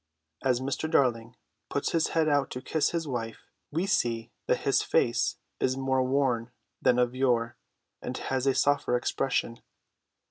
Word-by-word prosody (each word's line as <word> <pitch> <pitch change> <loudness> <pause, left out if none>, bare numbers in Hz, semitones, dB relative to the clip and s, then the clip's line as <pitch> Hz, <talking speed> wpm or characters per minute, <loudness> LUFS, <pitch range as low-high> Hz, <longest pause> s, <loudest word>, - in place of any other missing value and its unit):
As 125 -2 +2
Mr. 140 +4 -2
Darling 120 -6 +1 0.3
puts 140 - -1
his 165 -2 +2
head 160 -1 +3
out 145 -2 +2
to 125 - -6
kiss 155 +1 +1
his 165 -2 -2
wife, 115 -4 -4 0.2
we 165 +5 -1
see 115 - 0 0.2
that - - +1
his - - +2
face - - +1 0.2
is 130 0 +1
more 130 -1 +1
worn 130 -3 +1 0.3
than 125 - +4
of 125 0 +2
yore, 120 -3 +1 0.5
but - - -4 0.2
has 130 0 0
a 135 - +3
softer 140 -2 +2
expression. 120 -2 -1
130 Hz, 155 wpm, -28 LUFS, 120-140 Hz, 0.5 s, than